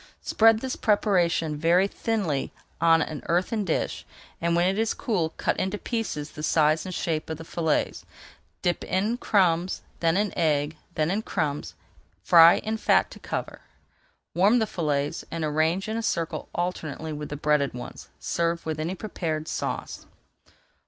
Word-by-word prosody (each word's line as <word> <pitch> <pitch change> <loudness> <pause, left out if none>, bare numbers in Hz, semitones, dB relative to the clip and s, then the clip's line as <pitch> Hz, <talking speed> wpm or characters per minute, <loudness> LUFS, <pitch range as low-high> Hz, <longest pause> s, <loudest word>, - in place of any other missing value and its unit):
Spread 225 0 +4
this 260 -1 -3
preparation 175 -7 +2
very 170 +5 +3
thinly 200 -11 -2 0.3
on 165 -1 +5
an 155 -2 -6
earthen 185 +5 +1
dish, 170 -5 -2 0.4
and 170 0 +1
when 175 +1 +3
it 195 +3 0
is 225 0 +1
cool 180 -9 0
cut - - 0
into 190 +2 -1
pieces 205 -11 -3
the 150 - -8
size 155 +2 +2
and 185 - -5
shape 160 -2 -2
of 160 - -3
the 165 - -8
fillets; 160 -1 -1 0.6
dip 175 -1 0
in 205 +5 0
crumbs, 185 -6 +1 0.2
then 165 +1 +2
in 205 0 0
egg, 150 -2 +1 0.2
then 155 +2 +1
in 205 +3 0
crumbs, 150 -8 -3 0.4
and 95 - -31
fry 170 0 +8
in 220 +1 -2
fat - - +3
to - - -11
cover. - - -5 0.7
Warm 200 +7 +4
the 225 - +2
fillets 150 -7 -2
and 165 -1 -3
arrange 160 +5 +1
in 220 +1 -2
a - - -1
circle 170 -7 -2
alternately 160 -3 -3
with 150 0 -6
the 145 - -5
breaded 150 -2 +1
ones. 125 - -8
Serve 170 0 -1
with 160 -1 -3
any 165 +4 -2
preferred 160 -6 -4
sauce. - - -4
170 Hz, 165 wpm, -26 LUFS, 155-195 Hz, 0.7 s, fry